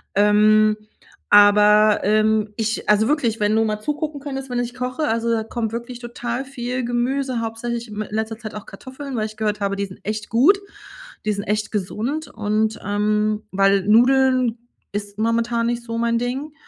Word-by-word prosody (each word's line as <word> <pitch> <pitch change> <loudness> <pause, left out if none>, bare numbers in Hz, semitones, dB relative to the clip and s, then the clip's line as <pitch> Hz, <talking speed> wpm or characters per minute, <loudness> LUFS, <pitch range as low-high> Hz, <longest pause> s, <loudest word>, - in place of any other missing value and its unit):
Ähm, 210 +1 +4 0.5
aber, 210 +1 +6
ähm, 215 +1 +2
ich 220 -1 -2
also 210 +1 +4
wirklich, 245 -7 0
wenn 210 +1 +2
du 225 - +3
mal 215 -1 -2
zugucken 295 +2 -3
könntest, 270 -1 -6
wenn 245 - -2
ich 245 0 -3
koche, 255 +4 -2
also, 230 -1 0
da 225 -1 0
kommt 225 0 -3
wirklich 240 +1 -6
total 240 +1 -4
viel 255 -1 -4
Gemüse, 250 +1 -1
hauptsächlich 230 +1 -4
m 210 0 -5
in - - -12
letzter 220 0 -3
Zeit 215 -3 -8
auch 210 - -7
Kartoffeln, 260 +6 -8
weil 215 -2 -1
ich 215 0 -13
gehört 210 -1 -1
habe, 200 0 0
die 200 0 -2
sind 190 -1 -12
echt 215 0 -4
gut. 290 - +4 0.7
Die 215 - +1
sind 200 0 -4
echt 210 +1 -1
gesund 235 - -3
und, 215 0 -1
ähm, 210 +1 0
weil 195 0 +3
Nudeln 255 +1 +4 0.4
ist 205 0 -5
momentan 230 +1 +1
nicht 240 0 -2
so 230 -1 -5
mein 235 0 +1
Ding. 260 +5 -3
225 Hz, 180 wpm, -21 LUFS, 210-245 Hz, 0.7 s, aber